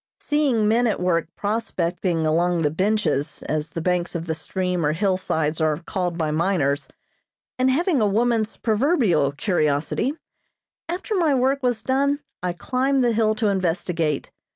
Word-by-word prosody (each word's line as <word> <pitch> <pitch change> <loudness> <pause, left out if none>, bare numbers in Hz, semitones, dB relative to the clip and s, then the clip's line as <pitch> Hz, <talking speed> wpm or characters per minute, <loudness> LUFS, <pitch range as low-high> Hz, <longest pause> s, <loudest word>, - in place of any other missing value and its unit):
Seeing 275 -8 +1
men 235 +3 +3
at 220 - 0
work 175 -2 +1
prospecting 180 -5 -1
along 170 +2 +2
the 150 - +2
"benches," 165 -5 0
as 155 0 -2
the 165 - -5
banks 180 -1 0
of 170 0 -4
a 160 - 0
stream 180 +2 -2
or 150 0 +2
hillsides 165 -4 0
are 155 -1 +2
called 175 -2 -2
by 155 -3 0
miners, 155 -4 0 0.7
and 255 +1 +3
having 310 - +2
a 210 - +3
woman's 225 +1 +1
proverbial 220 - +2
curiosity, 155 - 0 0.7
after 365 +5 -3
my 330 -8 +2
work 265 +2 +1
was 245 -4 0
done 280 +2 +1 0.2
I 180 0 -1
climbed 260 +7 0
the 240 -1 +2
hill 215 -1 +2
to 215 -1 +1
investigate. 170 -5 -1
185 Hz, 155 wpm, -23 LUFS, 165-240 Hz, 0.7 s, men